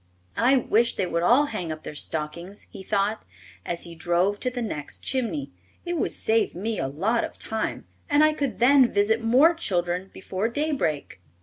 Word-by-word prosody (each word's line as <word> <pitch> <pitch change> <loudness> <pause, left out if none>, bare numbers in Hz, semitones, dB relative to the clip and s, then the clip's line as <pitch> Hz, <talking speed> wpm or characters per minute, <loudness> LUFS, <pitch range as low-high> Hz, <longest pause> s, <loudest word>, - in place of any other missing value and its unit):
"I 255 +4 +4
wish 235 -1 +2
they 190 - 0
would 170 -1 -1
all 245 +11 +5
hang 185 - -4
up 155 0 -7
their - - -7
stockings," 160 +6 -5
he 200 - -9
thought, 200 +2 -1 0.4
as 170 - -3
he 170 - -8
drove 175 +4 0
to 250 - -1
the 250 0 -5
next 150 -9 -5
chimney. 225 - -2 0.3
"It 350 0 -2
would 320 - -1
save 225 +1 +1
me 210 +3 -3
a 135 - -1
lot 200 - 0
of - - -6
time 220 0 -3 0.2
and 290 +1 +5
I 310 0 +4
could 280 -4 -2
then 255 +1 +5
visit 220 +3 +2
more 260 +9 +5
children 180 - -1
before 190 +3 -3
daybreak." 265 - -2
215 Hz, 185 wpm, -25 LUFS, 175-250 Hz, 0.4 s, all